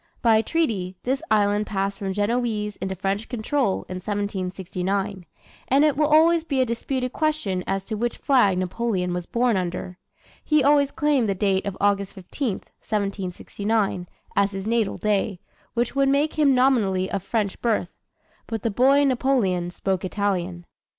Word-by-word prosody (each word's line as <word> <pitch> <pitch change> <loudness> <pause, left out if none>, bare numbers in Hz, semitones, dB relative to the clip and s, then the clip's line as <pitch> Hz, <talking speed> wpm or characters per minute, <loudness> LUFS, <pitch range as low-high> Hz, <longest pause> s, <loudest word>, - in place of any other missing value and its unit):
By 225 -2 +5
treaty, 215 - -1
this 265 +3 0
island 210 0 +2
passed 195 -1 -2
from 195 -1 -2
Genoese 210 0 -1
into 190 0 -3
French 195 +4 -2
control 245 -2 -1
in 185 - -5
1769; 190 -1 -3 0.4
and 275 +3 +4
it 300 - +2
will 300 +1 +2
always 320 +2 +5
be 280 -5 -1
a 255 - +4
disputed 250 +2 -2
question 300 -13 -1
as 195 0 -1
to 220 - -6
which 235 +3 -2
flag 245 -9 +3
Napoleon 185 -1 -1
was 175 -1 -4
born 240 -3 +1
under. 180 0 -4 0.4
He 305 -2 +3
always 285 0 +4
claimed 285 -7 +1
the 195 - +1
date 195 0 +1
of 195 - -4
August 200 -1 +1
15, 210 +7 -3 0.3
1769, 200 -1 -2 0.3
as 200 0 +2
his 195 0 -5
natal 225 -2 0
day, 205 -2 0 0.4
which 240 +3 0
would 275 0 +3
make 285 +3 +2
him 285 -4 +3
nominally 215 -8 +2
of 200 - -1
French 205 0 -2
birth. 215 -6 0 0.6
But 225 -3 -4
the 230 - 0
boy 270 +6 +4
Napoleon 240 -10 +1
spoke 190 0 -2
Italian. 185 -3 -2
210 Hz, 155 wpm, -24 LUFS, 190-255 Hz, 0.6 s, By